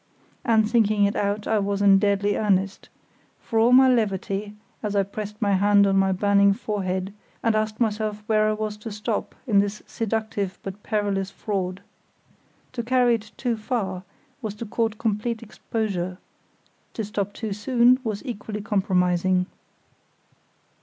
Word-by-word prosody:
And 220 -2 +3
thinking 215 -3 +3
it 200 - 0
out 205 +1 -1
I 220 - +2
was 200 0 -1
in 200 -1 +6
deadly 200 0 +1
earnest, 195 -2 0 0.5
for 225 - -1
all 230 +2 +5
my 260 +1 +8
levity, 205 -3 0 0.3
as 210 -2 -3
I 200 - +4
pressed 210 +1 -7
my 205 -2 +1
hand 200 +1 +5
on 195 -1 +2
my 195 0 +3
burning 200 +1 +4
forehead 195 -3 -3 0.3
and 230 - +3
asked 215 0 -1
myself 215 -2 -1
where 215 -1 +3
I - - +1
was 215 0 -3
to 220 +1 -7
stop 210 +1 -3
in 210 -5 +4
this 205 +1 -1
seductive 220 -4 -2
but 195 +1 -7
perilous 200 -3 -1
fraud. 195 -1 -3 0.9
To 245 - -2
carry 245 0 +3
it 220 -1 -3
too 245 -3 0
far 215 -5 -3 0.4
was 215 -3 -4
to 230 - -6
court 225 0 -1
complete 225 +1 -2
exposure; 200 -5 -3 0.8
to 220 - -2
stop 205 -1 -3
too 215 0 -4
soon 240 +4 +3
was 215 +1 -4
equally 215 -4 -5
compromising. 185 -3 +1
210 Hz, 155 wpm, -24 LUFS, 200-220 Hz, 0.9 s, my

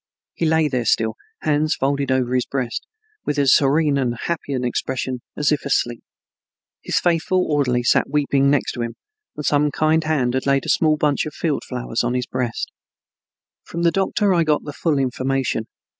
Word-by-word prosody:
He 165 - -1
lay 160 -1 +3
there 125 -4 -1
still, 110 0 +2 0.3
hands 155 +1 +1
folded 140 0 0
over 130 -1 +1
his 125 -1 +1
breast 130 -3 -3 0.4
with 150 - -2
as 140 -2 +5
serene 145 0 +3
and 120 -3 -1
happy 170 -4 -3
an 130 -1 -1
expression 125 +1 -2 0.2
as 150 0 +2
if 150 - 0
asleep. 120 -4 0 0.8
His - - -1
faithful 175 +2 +1
orderly 130 -5 +1
sat 120 - +3
weeping 140 -1 +2
next 145 0 +1
to 120 - -5
him, 115 0 -4 0.4
and 150 - -4
some 150 0 +3
kind 155 +2 +2
hand 140 -6 0
had 130 +1 -1
laid 140 -1 +2
a - - -4
small 155 -2 +3
bunch 150 0 +1
of 155 - -8
field 155 -4 -1
flowers 125 -2 -2
on 120 +1 0
his 125 -1 -1
breast. 125 -3 -3 0.9
From 170 +1 -5
the 170 - +4
doctor 195 +2 +1
I 170 -2 +3
got 155 -2 +1
the 145 - -7
full 155 0 0
information. 130 -3 -1
140 Hz, 190 wpm, -21 LUFS, 125-155 Hz, 0.9 s, as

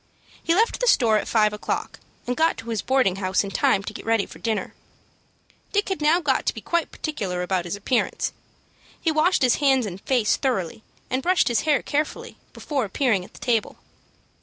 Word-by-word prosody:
He 330 - +2
left 450 +4 +2
the - - 0
store 230 - +4
at - - -6
five 215 -2 +3
o'clock, 210 - -4 0.3
and 245 - -1
got 325 +3 +2
to 225 +1 -8
his 225 -4 -1
boarding 255 -8 +2
house 190 0 +1
in 200 - -6
time 195 0 +2
to - - -6
get - - -8
ready 225 -2 +1
for - - -13
dinner. 220 -4 -2 1.0
Dick 410 0 +1
had 380 -4 -2
now 310 +4 +4
got 285 -6 0
to - - +1
be - - -5
quite 340 +5 -1
particular 195 - -3
about 180 -1 -1
his 175 - -3
appearance. 230 +4 -1 0.7
He 325 - +1
washed 310 +1 +2
his 250 - +4
face 270 -4 +3
and 195 -1 -7
hands 245 -6 +3
thoroughly, 220 - -2 0.3
and 260 +1 0
brushed 360 0 +2
his 240 - +1
hair 295 - +3
carefully, 300 +1 -3
before 280 -4 -3
appearing 215 -2 +1
at - - -15
the - - -12
table. 230 -4 0
245 Hz, 200 wpm, -24 LUFS, 205-300 Hz, 1.0 s, store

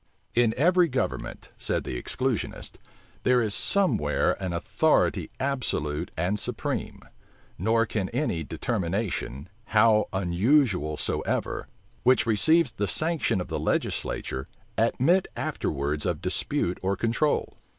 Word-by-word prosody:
In 120 -2 +3
every 175 +5 +4
government, - - -3
said - - -1
the - - -5
exclusionists, 130 -3 -2 0.4
there 125 -1 +4
is 110 -4 0
some 190 - +3
where 75 0 +1
an 95 -2 -2
authority 85 - +1
absolute 90 - -1
and 90 +6 0
supreme; - - -3 0.6
nor 115 +4 +3
can 105 -3 -2
any 120 - -1
determination, 95 - -2 0.2
how 110 -1 +4
unusual 95 - +2
soever, - - -2 0.3
which 130 -1 +4
receives 155 +7 +4
the 105 -3 -2
sanction 155 - 0
of 90 - -5
the - - -2
legislature, 65 0 -2 0.3
admit 175 +8 +3
afterwards 75 +1 -2
of - - -1
dispute 90 - -1
or 95 +1 0
control. 120 +8 0
110 Hz, 120 wpm, -27 LUFS, 90-130 Hz, 0.6 s, every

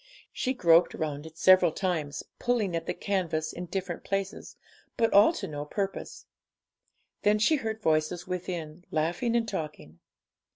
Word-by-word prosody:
She 260 0 -1
groped 170 -6 +5
round 150 -1 -4
it 160 0 -14
several 185 -2 +6
times, 160 -5 -2 0.2
pulling 225 -8 0
at 165 0 -3
the - - 0
canvas 165 -6 -1
in 175 +1 -6
different 180 -1 -4
places, 195 0 -3 0.4
but 230 - +2
all 205 +9 +7
to - - -5
no 145 -1 -5
purpose. 195 +6 -4 1.0
Then 210 +1 +4
she 265 +9 +3
heard 220 -3 -4
voices 155 +2 +1
within, 175 -2 -5
laughing 170 +10 0
and 230 -1 +1
talking. 150 - -6
180 Hz, 150 wpm, -28 LUFS, 160-205 Hz, 1.0 s, all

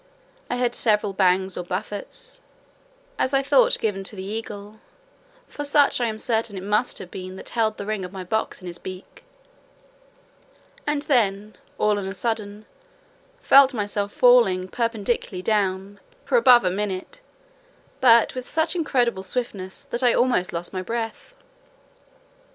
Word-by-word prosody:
I - - -1
heard 245 -1 0
several 210 -4 +1
bangs 190 0 +2
or 180 - -4
buffets, 210 - -6 0.8
as 265 +1 +1
I 270 - +2
thought - - +4
given 200 -3 -2
to 210 - -5
the 190 - -6
eagle 210 0 -7 0.7
(for 290 - -6
such 285 -2 +3
I 240 - +2
am 215 -1 -3
certain 220 -2 -1
it 185 - -6
must 210 +5 0
have 185 -2 -9
been 185 0 -7
that - - -8
held 220 -2 0
the 200 - -6
ring 215 -2 -3
of 180 - -7
my 190 -1 -7
box 220 +3 -2
in - - -7
his 170 -1 -4
beak), 190 - -10 1.6
and 295 -1 0
then, 210 -6 +1 0.2
all 210 -1 +2
on 195 - -5
a 195 - -5
sudden, 215 -1 -3 0.8
felt 275 -1 +6
myself 205 -1 -2
falling 225 -8 +4
perpendicularly 230 -4 -2
down, 200 -1 -1 0.3
for - - 0
above 250 - +6
a 180 - +2
minute, 195 - -4 0.8
but 235 -4 +5
with 255 -1 -7
such 320 +2 0
incredible 245 - 0
swiftness, 190 -2 -4
that 235 - -4
I 245 -2 +4
almost 240 -7 +1
lost 170 +2 -4
my 185 - -2
breath. 225 +3 -5
215 Hz, 155 wpm, -23 LUFS, 190-245 Hz, 1.6 s, felt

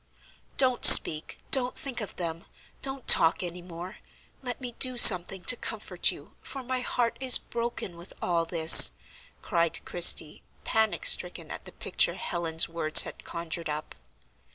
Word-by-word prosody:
"Don't 255 -2 -1
speak, 155 0 +6
don't 255 -2 -1
think 270 -6 -5
of 210 - -10
them! 165 -1 -9 0.4
Don't 270 -1 -8
talk 165 +3 +3
any 175 0 -8
more; 175 +3 -13 0.4
let 245 -2 -9
me 250 -2 -9
do 255 -1 +2
something 185 -4 +5
to 250 - +1
comfort - - -5
you, - - -16
for 270 -1 -11
my 255 +1 -7
heart 245 -1 -6
is 260 -1 +4
broken 235 -6 -9
with 170 +2 -15
all 170 -2 -4
this," 165 -1 +6 0.5
cried 170 -4 -5
Christie, 170 -3 +2 0.2
panic 220 - -4
stricken - - 0
at - - -12
the - - -15
picture - - -4
Helen's 165 -2 -5
words 165 -2 +2
had - - -14
conjured 170 -1 -10
up. 150 +1 -9
180 Hz, 155 wpm, -23 LUFS, 170-245 Hz, 0.5 s, speak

